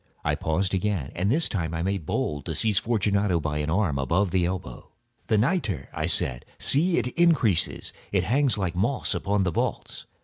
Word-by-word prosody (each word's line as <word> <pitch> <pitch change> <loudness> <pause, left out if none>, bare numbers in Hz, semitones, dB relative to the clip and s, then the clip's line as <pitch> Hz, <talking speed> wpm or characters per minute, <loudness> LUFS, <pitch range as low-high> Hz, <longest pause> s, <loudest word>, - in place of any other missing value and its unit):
I - - +2
paused 90 +5 -1
again, 95 -7 -1
and 90 +4 0
this 155 +8 +2
time 85 -5 -3
I 80 - -2
made 95 -4 -2
bold 75 -2 -2
to 80 - -3
seize 105 0 +2
Fortunato 100 -5 +1
by 75 -1 -2
an 75 +1 -2
arm 80 -5 +1
above 85 +8 +1
the 90 -1 +2
elbow. 90 -1 -6 0.4
"The 110 - +2
nitre!" 105 - 0
I - - -2
said: 60 -1 +1
"see, 165 +5 +3
it 125 - 0
increases. 130 - +2 0.2
It - - +2
hangs 130 -2 +2
like 90 -3 -2
moss 120 +9 0
upon 100 0 0
the 90 - 0
vaults. - - -3
95 Hz, 190 wpm, -26 LUFS, 85-110 Hz, 0.4 s, see